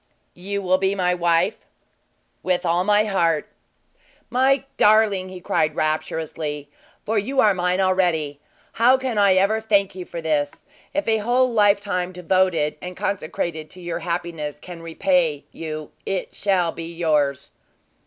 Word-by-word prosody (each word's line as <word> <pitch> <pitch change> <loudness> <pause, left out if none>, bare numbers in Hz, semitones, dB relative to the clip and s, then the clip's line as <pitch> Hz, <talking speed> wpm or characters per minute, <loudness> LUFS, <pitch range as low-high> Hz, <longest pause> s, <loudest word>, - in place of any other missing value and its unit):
"You 200 +3 -4
will 185 0 +2
be 195 +1 +1
my 180 -2 +1
wife?" 175 +3 +1 0.8
"With 180 0 0
all 170 +1 +2
my 210 +2 +3
heart!" 170 -7 +1 0.8
"My 265 +2 +3
darling!" 210 -3 +3
he 185 -1 -8
cried, 155 -3 0
rapturously 155 -1 -3 0.3
"for 220 0 +1
you 265 +7 -2
are 210 -4 +5
mine 180 0 0
already 175 -6 +1 0.3
how 245 +3 +4
can 260 -5 -2
I 200 -2 +5
ever 200 +4 +2
thank 200 -3 +2
you 185 -1 -7
for 170 - -7
this? 150 -3 -2 0.3
If 295 +1 -2
a 220 -1 +3
whole 245 +3 +2
lifetime 200 -4 +2
devoted 180 -3 +1
and 180 0 -7
consecrated 160 -4 -3
to 185 - -12
your 175 -1 -4
happiness 170 -3 -4
can 170 +2 -10
repay 165 - 0
you, 155 -2 -6
it 195 -2 -3
shall 185 -4 +1
be 165 0 -7
yours!" 150 -5 0
180 Hz, 145 wpm, -22 LUFS, 165-205 Hz, 0.8 s, are